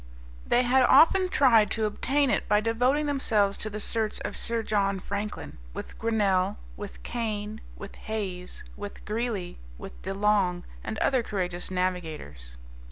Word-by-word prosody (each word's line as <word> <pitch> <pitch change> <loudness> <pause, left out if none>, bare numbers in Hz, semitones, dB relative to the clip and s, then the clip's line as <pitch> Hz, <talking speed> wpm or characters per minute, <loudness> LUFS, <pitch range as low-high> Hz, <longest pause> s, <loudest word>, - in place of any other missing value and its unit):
They 245 - +4
had 255 +2 +4
often 365 +6 +6
tried 230 - +5
to 220 0 0
obtain 270 +6 +1
it - - -1
by 210 0 +5
devoting 245 +7 +1
themselves 215 -8 +2
to 215 - -3
the 210 0 -5
search 220 0 -2
of - - -4
Sir 230 -1 +2
John 200 -2 +1
Franklin, 200 - -5 0.2
with - - -8
Grinnel, 205 -3 +1 0.2
with 205 -1 -9
Kane, 215 -2 -3 0.2
with 200 - -9 0.2
Hayes, 185 -5 -4
with 205 0 -8
Greely, 215 -5 -3 0.2
with 60 0 -10
De 195 - -4
Long, 195 -3 +2 0.2
and 220 - -4
other 260 +2 +2
courageous 180 -5 -3
navigators. 160 - -4
210 Hz, 150 wpm, -27 LUFS, 190-230 Hz, 0.2 s, often